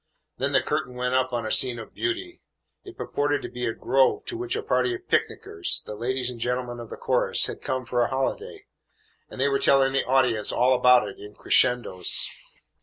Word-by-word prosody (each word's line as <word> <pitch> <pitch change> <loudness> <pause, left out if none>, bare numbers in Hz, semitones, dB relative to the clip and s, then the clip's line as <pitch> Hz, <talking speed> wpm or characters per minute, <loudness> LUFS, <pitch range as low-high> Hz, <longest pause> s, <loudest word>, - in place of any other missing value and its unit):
Then - - 0
the - - +4
curtain 125 - -2
went 125 0 -2
up 130 0 +1
on 120 -2 -2
a 110 - -3
scene 125 -2 +3
of 115 - -10
beauty. 360 0 -3 0.4
It 380 -2 -12
purported 145 0 -1
to - - -5
be 125 0 -4
a 115 - -1
grove 135 +2 +2
to - - -6
which 365 +2 -3
a 445 - -3
party 370 - +1
of 370 0 -12
picnickers, 390 - -1
the - - -6
ladies 125 +3 -2
and 120 - -10
gentlemen 120 0 -2
of 115 -2 -9
the - - -8
chorus, - - +1
had - - -6
come 130 -1 -3
for 120 +1 0
a 120 - +3
holiday, 135 0 -3 0.6
and - - -11
they 135 - +3
were 140 -1 +1
telling 135 -1 +3
the 135 - +2
audience 125 -5 +2
all 125 +2 +3
about 125 -3 +5
it 100 - -9
in 105 0 -11
crescendos. 120 -7 +1
130 Hz, 210 wpm, -25 LUFS, 120-140 Hz, 0.6 s, about